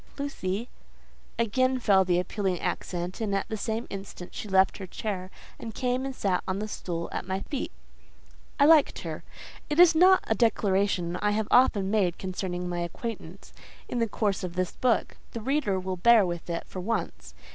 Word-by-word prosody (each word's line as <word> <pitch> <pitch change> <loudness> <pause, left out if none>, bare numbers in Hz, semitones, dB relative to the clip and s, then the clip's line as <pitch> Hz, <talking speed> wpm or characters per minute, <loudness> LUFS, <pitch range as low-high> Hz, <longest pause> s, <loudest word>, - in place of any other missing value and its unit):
Lucy…." 235 -6 -3 0.7
Again 255 +3 +2
fell 200 -6 +4
the 180 -1 +2
appealing 185 -1 -1
accent, 180 +4 -3
and 205 -3 0
at 195 - -1
the 220 - -2
same 220 +2 -3
instant 195 -2 -8
she - - -6
left 190 +1 +3
her 190 - -6
chair, 185 -1 -4 0.3
and 225 -2 -7
came 255 +1 -1
and 270 - -6
sat 190 -6 0
on 185 0 -1
the 210 +1 -3
stool 170 -5 -4
at - - -4
my 190 +1 -2
feet. 280 -3 -4 0.9
I 285 - +6
liked 310 -1 +5
her. - - -5 0.5
It 300 +2 0
is 350 -1 +8
not 370 +3 +6
a - - 0
declaration 195 -5 +1
I 210 - +1
have 215 0 -1
often 205 -6 +4
made 190 -5 +1
concerning 180 -1 -4
my 175 0 -3
acquaintance, 185 +1 -6 0.3
in 245 - -2
the 230 - +2
course 205 -2 -1
of 180 -1 -5
this 185 -1 -1
book: 245 -3 0 0.2
the 230 - -4
reader 255 -6 0
will 185 0 -4
bear 225 +2 +6
with 175 -1 -5
it 170 0 -3
for 185 - -8
once. 180 - -3
200 Hz, 185 wpm, -27 LUFS, 185-235 Hz, 0.9 s, is